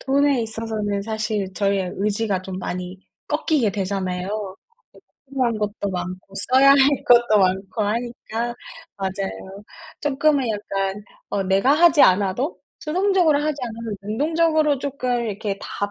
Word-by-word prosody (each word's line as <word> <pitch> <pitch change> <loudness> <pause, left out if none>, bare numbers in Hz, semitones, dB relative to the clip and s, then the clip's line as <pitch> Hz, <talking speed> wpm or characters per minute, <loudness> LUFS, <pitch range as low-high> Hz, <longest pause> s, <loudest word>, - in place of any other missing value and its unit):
돈에 275 -2 +2
있어서는 220 -2 -3
사실 215 -3 -2
저희의 195 -2 0
의지가 205 -1 -1
좀 185 0 -6
많이 180 0 -5 0.3
꺾이게 275 - +1
되잖아요. 190 0 -3 0.7
대출한 255 -5 -1
것도 205 -1 -3
많고 185 +2 -6 0.2
써야 275 +1 +7
할 280 - +7 0.3
것도 235 -3 +5
많고 190 +3 0
하니까 235 +1 -3 0.4
맞아요. 195 +1 -5 0.4
쪼끔은 285 -2 +1
약간 200 -1 -3 0.3
어 195 - 0
'내가 195 +8 +3
하지 325 -1 +6
않아도 200 - +2 0.2
수동적으로 345 -2 +2
하지 305 -1 -1
않으면 225 -2 -5
능동적으로 305 +6 +1
쪼끔 255 -3 -2
이렇게 200 -1 -3
다 205 0 -4
215 Hz, 295 characters per minute, -22 LUFS, 195-265 Hz, 0.7 s, 써야